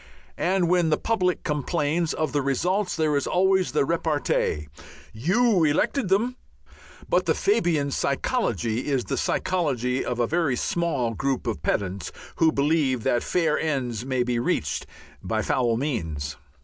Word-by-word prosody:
And 185 -1 +2
when 175 -2 +3
the 150 - +2
public 185 -6 0
complains 155 +2 0
of 155 - -2
the 145 - +2
results, 180 +9 0
there 155 -2 +1
is 140 - 0
always 190 0 +2
the 150 - +2
repartee, 150 - 0 0.5
"You 185 - +2
elected 180 - +1
them." 235 +6 +1 0.7
But - - +1
the - - +3
Fabian 165 - +1
psychology 125 - -1
is 135 -4 +1
the - - -3
psychology 135 -8 0
of 125 -1 -3
a 120 - +3
very 160 -1 +1
small 140 -6 -1
group 135 +2 -2
of 115 -3 -3
pedants 95 -2 -2 0.3
who 160 -1 +4
believe 140 -5 +1
that 120 - +2
fair 160 -4 +1
ends 125 -8 -2
may 130 -1 0
be 120 -1 -1
reached 75 - -1 0.3
by - - -1
foul 120 -3 +1
means. 80 - -3
145 Hz, 150 wpm, -25 LUFS, 125-175 Hz, 0.7 s, who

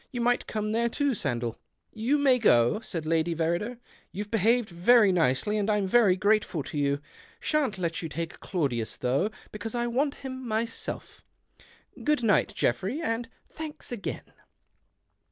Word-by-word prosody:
You 245 - -4
might 245 +1 +1
come 215 -1 -2
lere 235 +2 +1
too, 285 +4 0
Sandell." 120 - -1 0.2
" - - -49
You 290 +3 +4
may 270 -3 +4
go," 120 - +4
said 170 -8 -5
Lady 165 +1 +1
Verrider. 170 +9 -1 0.3
You've 205 +1 -6
behaved 230 +2 +3
very 200 +5 +5
nicely, 175 +5 +1
and 205 +1 0
I'm 210 -2 +2
very 195 -2 +4
:ateful 205 -6 +1
to - - -5
you. 140 0 +1 0.4
Shan't 285 -10 0
let 170 -2 -2
you 165 - -4
take 165 +2 -5
Claudius 135 - -2
LOUgh, 135 +11 +2 0.2
because 220 +2 -5
I 240 0 0
want 275 +5 0
him 260 -1 -5
myself. 230 +1 -3 0.8
Good 300 -3 +2
Lght, 220 -4 +2
Geoffrey, 190 - 0
and 230 -6 -2 0.2
thanks 310 -3 -6
again." 235 -5 -5
210 Hz, 155 wpm, -28 LUFS, 170-240 Hz, 0.8 s, very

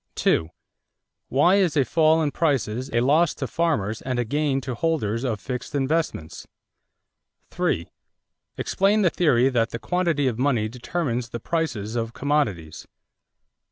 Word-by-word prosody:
Why 175 +9 +4
is 180 -6 +2
a 135 - +4
fall 160 +1 +3
in 145 - 0
prices 130 -6 -1
a 115 - +2
loss 150 +6 +3
to 135 - -4
farmers 130 -10 -1
and 130 -1 -3
a 120 - 0
gain 145 +2 0
to 125 0 -4
holders 115 -6 -1
of 115 -5 -1
fixed 125 +6 -5
investments? 140 - -2 1.0
3. 85 0 -1 0.7
Explain 200 +2 +2
the 175 - +3
theory 130 -7 +3
that 115 -3 +1
the - - -5
quantity 170 -1 0
of 120 -3 -1
money 125 -5 +1
determines 125 0 -3
the 120 - -5
prices 120 -8 -2
of 115 -1 -2
commodities. 105 - -2
135 Hz, 140 wpm, -24 LUFS, 115-160 Hz, 1.0 s, Why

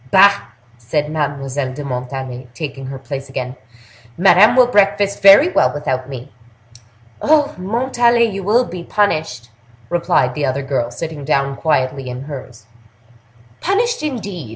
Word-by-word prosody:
"Bah!" 200 +5 +5 0.3
said 150 +6 -2
Mademoiselle 140 -3 -3
de 145 +2 -7
Montalais, 130 -1 -5
taking 140 -4 -6
her 135 0 -6
place 135 +1 -7
again; 130 -1 -5 0.6
"Madame 190 +5 +6
will 255 -1 +6
breakfast 200 -3 +1
very 200 - +8
well - - +2
without 135 -3 -3
me!" 130 -2 -8 0.9
"Oh! 300 -1 +3
Montalais, 235 +4 +1
you 195 -3 -4
will 225 +6 +2
be 180 -4 -8
punished!" 155 - -1 0.4
replied 170 -7 +1
the 150 - -4
other 135 0 -1
girl, 135 -3 -2
sitting 150 +4 -6
down 140 -1 0
quietly 135 -3 -1
in 125 +1 -6
hers. 130 -6 -10 0.9
"Punished, 460 +6 0
indeed! 200 - -5
150 Hz, 135 wpm, -18 LUFS, 130-200 Hz, 0.9 s, very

